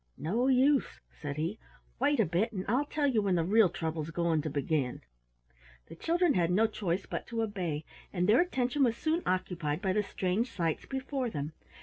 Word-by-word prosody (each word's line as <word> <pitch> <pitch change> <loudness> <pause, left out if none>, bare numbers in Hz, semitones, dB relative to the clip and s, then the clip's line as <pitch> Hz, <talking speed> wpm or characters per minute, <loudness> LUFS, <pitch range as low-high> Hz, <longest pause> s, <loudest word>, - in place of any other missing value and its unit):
"No 225 - 0
use," 270 +1 +3
said 145 -2 -6
he. 165 +8 -2 0.4
"Wait 285 +1 +2
a 220 - +5
bit, 180 +8 0
and 190 -4 -4
I'll 255 +7 +2
tell 295 0 -1
you 250 -6 +3
when 195 -3 +1
the 170 - +2
real 205 +2 +5
trouble's 160 -3 -3
going 165 -1 +1
to 155 - -3
begin." 140 -2 -1 0.9
The - - -9
children 340 - +2
had 170 -2 +2
no 200 +5 +4
choice 195 -4 -2
but - - -5
to 230 -1 -1
obey, 180 -8 -3 0.3
and 180 -1 0
their 225 +8 +6
attention 275 -5 +1
was 235 -2 +2
soon 320 +2 0
occupied 175 -5 -1
by 190 -1 0
the 210 - +2
strange 200 +4 -1
sights 165 -4 -2
before 265 -1 -2
them. 150 -5 -4
195 Hz, 195 wpm, -31 LUFS, 165-250 Hz, 0.9 s, their